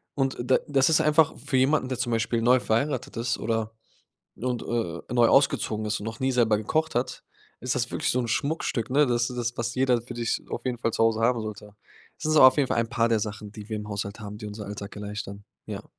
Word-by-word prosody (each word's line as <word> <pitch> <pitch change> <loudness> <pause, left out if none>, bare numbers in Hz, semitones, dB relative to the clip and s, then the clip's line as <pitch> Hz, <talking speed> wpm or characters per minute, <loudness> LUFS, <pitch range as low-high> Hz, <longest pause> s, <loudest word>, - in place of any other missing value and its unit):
Und 135 -2 0
d 125 +2 +2
das 140 0 +3
ist 160 - +4
einfach 155 +1 +4
für 140 -2 -1
jemanden, 130 +1 +3
der 130 - -2
zum 120 -1 -2
Beispiel 115 +1 0
neu 125 +1 +5
verheiratet 125 +3 -1
ist 115 +1 -1
oder 110 0 -1 0.6
und, 125 -1 -3
äh, 115 -4 -3
neu 120 -2 +5
ausgezogen 110 -6 +2
ist 105 0 -1
und 105 - -7
noch 115 +1 -6
nie 130 0 +1
selber 115 -4 +3
gekocht 155 +8 -1
hat, 125 - -2 0.4
ist - - -2
das - - -1
wirklich - - -1
so 125 - +1
'n 120 - -1
Schmuckstück, 140 -3 -1
ne? 145 +3 +4
Das 120 -1 +1
ist 120 -1 -3
w - - -26
was 120 0 -2
jeder 130 -2 +2
für 120 - -9
sich 115 -1 -1
auf 120 - -5
jeden 125 -2 -2
Fall 115 - 0
zu 115 - +1
Hause 115 -1 +2
haben 120 0 +2
sollte. 105 -1 -8 0.4
Das - - -6
ist - - +2
aber 130 - +10
auf 130 - +3
jeden 140 -3 +3
Fall - - -1
ein 115 0 -1
paar 115 0 +1
der 115 - +3
Sachen, 105 -1 -5
die 105 0 -10
wir 110 - -2
im 105 0 -7
Haushalt 100 +1 -4
haben, 105 -1 -7
die 105 - -6
unseren 105 -1 -7
Alltag 100 0 -7
erleichtern. 105 -1 -6 0.2
Ja. - - -6
120 Hz, 250 wpm, -26 LUFS, 110-130 Hz, 0.6 s, aber